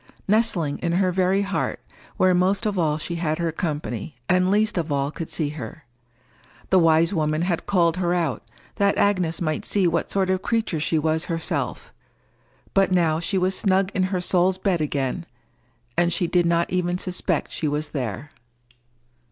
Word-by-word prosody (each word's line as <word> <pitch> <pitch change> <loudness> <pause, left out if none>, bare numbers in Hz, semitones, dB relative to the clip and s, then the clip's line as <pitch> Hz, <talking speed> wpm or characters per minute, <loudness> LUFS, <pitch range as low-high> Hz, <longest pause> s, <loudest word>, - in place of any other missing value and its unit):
Nestling 195 -9 +1
in 170 -1 -1
her 185 +1 +2
very 190 +2 +2
heart, 200 0 -2 0.4
where 185 0 +4
most 190 +5 +2
of 205 -3 0
all 155 -3 +1
she 170 +2 -4
had 155 -2 -1
her 170 -1 -1
company, 150 - -4
and 185 0 +3
least 210 +2 +2
of 160 -2 -3
all 140 0 0
could 160 0 -6
see 155 -3 -1
her. 130 -7 -8 0.9
The 190 - +6
wise 165 +1 +4
woman 155 -1 0
had 175 -2 -2
called 170 -3 +2
her 175 -2 0
out, 170 -7 0 0.4
that 200 0 +2
Agnes 180 -5 +1
might 155 -3 -1
see 200 -3 +1
what 170 -1 0
sort 190 -1 +1
of 185 0 0
creature 220 -7 -1
she 155 +2 0
was 160 +1 0
herself; 165 -2 -3 0.8
but 195 -1 +3
now 165 -3 +2
she 180 +3 -1
was 185 +1 +1
snug 195 0 +1
in 185 -1 +1
her 185 -1 -2
soul's 180 +1 +2
bed 190 -3 0
again, 145 +3 -2 0.7
and 175 0 +2
she 175 - +1
did 175 0 +2
not 170 0 +1
even 180 -1 0
suspect 180 -2 -1
she 155 - -2
was 150 +1 -1
there. 130 +1 -4
175 Hz, 175 wpm, -23 LUFS, 155-185 Hz, 0.9 s, The